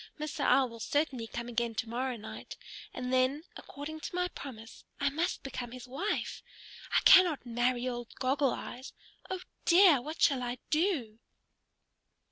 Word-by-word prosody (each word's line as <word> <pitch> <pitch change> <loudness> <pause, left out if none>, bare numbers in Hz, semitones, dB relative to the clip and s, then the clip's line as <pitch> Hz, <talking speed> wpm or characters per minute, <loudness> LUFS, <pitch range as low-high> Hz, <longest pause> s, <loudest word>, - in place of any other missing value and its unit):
Mr. 305 0 -4
Owl 270 -1 +5
will 230 0 -11
certainly 265 -3 -1
come 235 +1 -5
again 235 -1 -1
to 225 - -2
morrow 250 +2 -2
night, 220 0 -9 0.3
and 250 0 -4
then, 260 +4 +2
according 305 +3 -8
to 330 - -6
my 360 0 +1
promise, 225 -8 -10 0.2
I 280 0 +1
must 325 +5 -1
become 250 -3 -5
his 255 0 -9
wife. 300 +12 -2 0.6
I - - +4
cannot 350 -8 +7
marry 245 +1 0
old 240 -1 -4
Goggle 270 +1 +1
Eyes. 250 +2 -6 0.4
Oh 375 -1 -3 0.2
dear! 345 -6 +7
What 310 +5 -7
shall 275 -6 +4
I 245 0 -3
do?" 300 - 0
260 Hz, 155 wpm, -31 LUFS, 240-305 Hz, 0.6 s, cannot